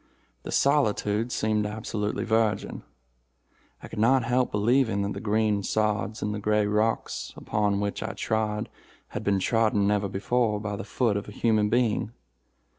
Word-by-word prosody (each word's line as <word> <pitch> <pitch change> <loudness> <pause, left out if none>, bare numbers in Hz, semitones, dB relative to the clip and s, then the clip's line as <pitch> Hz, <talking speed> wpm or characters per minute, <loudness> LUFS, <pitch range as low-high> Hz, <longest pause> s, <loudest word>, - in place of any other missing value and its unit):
The - - -7
solitude 115 -5 +1
seemed 105 -2 0
absolutely 105 -1 -3
virgin. 110 -1 0 1.0
I - - -7
could - - -7
not 125 +3 +4
help 125 +2 +1
believing 110 -1 +2
that 100 - -2
the - - -5
green 105 -1 +1
sods 105 +1 -1
and 105 - -1
the 105 - -3
gray 105 0 +2
rocks 105 +2 -1
upon 105 -1 0
which 100 0 -2
I 110 +1 -3
trod 110 0 -1 0.4
had - - -5
been 100 -1 +2
trodden 110 0 +2
never 100 -1 +1
before 105 +2 0
by 105 -1 -4
the - - -5
foot 110 0 0
of 100 - -5
a - - -8
human 105 -1 +1
being. 115 -1 +1
105 Hz, 160 wpm, -26 LUFS, 105-115 Hz, 1.0 s, not